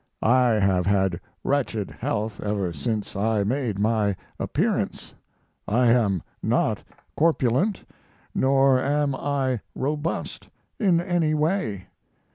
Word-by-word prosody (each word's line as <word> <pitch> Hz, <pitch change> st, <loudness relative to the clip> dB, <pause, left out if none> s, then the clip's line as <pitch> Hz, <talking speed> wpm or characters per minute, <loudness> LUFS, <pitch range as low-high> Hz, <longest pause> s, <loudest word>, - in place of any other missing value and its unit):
I 125 Hz, 0 st, +4 dB
have 95 Hz, -3 st, +2 dB
had 95 Hz, -3 st, +2 dB, 0.2 s
wretched 115 Hz, -8 st, -1 dB
health 105 Hz, 0 st, -3 dB
ever 100 Hz, -4 st, -1 dB
since 105 Hz, +10 st, -3 dB
I 105 Hz, +1 st, +1 dB
made 120 Hz, -1 st, -1 dB
my 105 Hz, -1 st, +1 dB, 0.2 s
appearance... -, -, -1 dB, 0.5 s
I 120 Hz, +3 st, +3 dB
am 105 Hz, -7 st, +2 dB, 0.2 s
not -, -, +1 dB, 0.3 s
corpulent, 165 Hz, -, +2 dB, 0.5 s
nor 135 Hz, 0 st, +4 dB
am 145 Hz, 0 st, +1 dB
I 135 Hz, -3 st, -1 dB, 0.2 s
robust 150 Hz, +4 st, -3 dB, 0.3 s
in 185 Hz, -6 st, +3 dB
any 170 Hz, -3 st, +1 dB
way. 150 Hz, -, -1 dB
120 Hz, 105 wpm, -25 LUFS, 105-145 Hz, 0.5 s, I